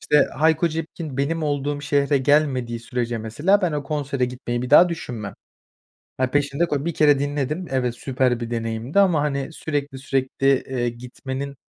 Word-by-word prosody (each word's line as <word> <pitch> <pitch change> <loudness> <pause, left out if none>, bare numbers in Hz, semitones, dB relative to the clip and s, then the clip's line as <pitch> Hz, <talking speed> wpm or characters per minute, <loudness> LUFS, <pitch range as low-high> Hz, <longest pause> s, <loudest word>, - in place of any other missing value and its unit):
işte, 150 - +4
Hayko 160 +3 +3
Cepkin 160 -2 -5
benim 155 +4 -1
olduğum 145 -1 -1
şehre 145 0 +2
gelmediği 130 -4 +1
sürece 120 0 -3
mesela 150 - +1
ben 170 -4 +1
o 145 - -2
konsere 140 -3 -1
gitmeyi 125 -1 -4
bir 125 - -5
daha 170 +5 +8
düşünmem. 120 - -5 0.9
Ya, 130 -1 +1
peşinde 145 +4 +1
ko 145 -3 -2
1 170 - -2
kere 145 -2 +4
dinledim. 145 +4 -2
Evet, 125 -3 0
süper 125 -2 0
bir 120 0 -5
deneyimdi 115 - 0
ama 180 -6 +4
hani, 140 0 -2
sürekli 145 -4 -3
sürekli, 135 0 -1 0.2
eee, 125 -2 -2
gitmenin 130 +3 -6
140 Hz, 165 wpm, -23 LUFS, 125-150 Hz, 0.9 s, daha